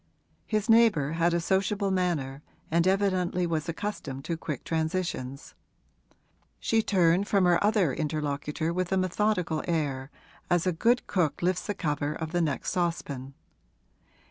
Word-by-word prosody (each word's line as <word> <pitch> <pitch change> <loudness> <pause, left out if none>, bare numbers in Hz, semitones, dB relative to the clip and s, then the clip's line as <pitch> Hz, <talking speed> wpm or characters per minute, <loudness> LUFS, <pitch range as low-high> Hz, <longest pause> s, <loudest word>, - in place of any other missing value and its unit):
His 215 0 0
neighbour 225 - +4
had 170 +1 +2
a 170 - +1
sociable 195 +3 0
manner 155 -7 -1 0.3
and 170 +2 +3
evidently 185 -2 +1
was 160 -2 -2
accustomed 155 -7 -5
to 170 - -1
quick 155 -4 -5
transitions; 160 -5 -3 1.1
she 225 -1 +2
turned 185 -1 +3
from 200 -3 +3
her 175 +1 +3
other 205 - +3
interlocutor 150 +1 -2
with 185 0 -2
a 190 - +2
methodical 185 -3 0
air, 145 -5 -1 0.4
as 175 -1 +2
a 185 - +2
good 235 +9 +2
cook 175 -4 0
lifts 180 0 0
the 205 - -2
cover 150 -3 -1
of 160 -1 -5
the 175 0 +1
next 150 -5 -1
saucepan. 145 -7 -2
170 Hz, 145 wpm, -28 LUFS, 155-190 Hz, 1.1 s, neighbour